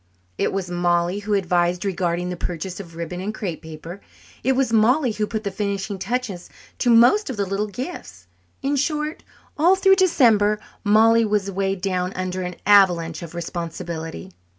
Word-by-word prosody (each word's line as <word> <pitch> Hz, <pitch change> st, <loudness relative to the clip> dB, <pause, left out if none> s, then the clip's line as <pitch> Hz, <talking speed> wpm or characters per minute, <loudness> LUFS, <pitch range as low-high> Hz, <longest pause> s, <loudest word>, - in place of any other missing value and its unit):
It -, -, +1 dB
was 195 Hz, -2 st, -3 dB
Mollie 175 Hz, +1 st, +1 dB
who 205 Hz, 0 st, -1 dB
advised 175 Hz, -1 st, +1 dB
regarding 180 Hz, -2 st, -1 dB
the 180 Hz, -, -3 dB
purchase 175 Hz, +2 st, -5 dB
of 170 Hz, -4 st, -10 dB
ribbon 170 Hz, +2 st, -5 dB
and 200 Hz, +3 st, -3 dB
crepe 195 Hz, -7 st, -5 dB
paper. 160 Hz, +4 st, -9 dB, 0.4 s
It 265 Hz, -, +3 dB
was 255 Hz, -3 st, 0 dB
Mollie 245 Hz, +4 st, +3 dB
who 210 Hz, 0 st, -2 dB
put 220 Hz, 0 st, -4 dB
the 200 Hz, -, -3 dB
finishing 200 Hz, 0 st, -3 dB
touches 230 Hz, -4 st, -3 dB, 0.3 s
to 245 Hz, -, +1 dB
most 245 Hz, -, +5 dB
of 255 Hz, -, -4 dB
the 200 Hz, -, 0 dB
little 195 Hz, +2 st, -2 dB
gifts. 205 Hz, -, -7 dB, 0.4 s
In 280 Hz, +1 st, +1 dB
short, 300 Hz, +2 st, -1 dB, 0.4 s
all 350 Hz, +5 st, +5 dB
through 385 Hz, 0 st, +4 dB
December 225 Hz, -, +4 dB, 0.2 s
Mollie 225 Hz, +2 st, +5 dB
was 205 Hz, -2 st, 0 dB
weighed 195 Hz, 0 st, -2 dB
down 185 Hz, -1 st, -1 dB
under 185 Hz, 0 st, -3 dB
an 180 Hz, -1 st, -4 dB
avalanche 175 Hz, -5 st, +4 dB
of 170 Hz, 0 st, -9 dB
responsibility. 170 Hz, 0 st, -5 dB
195 Hz, 170 wpm, -22 LUFS, 175-225 Hz, 0.4 s, most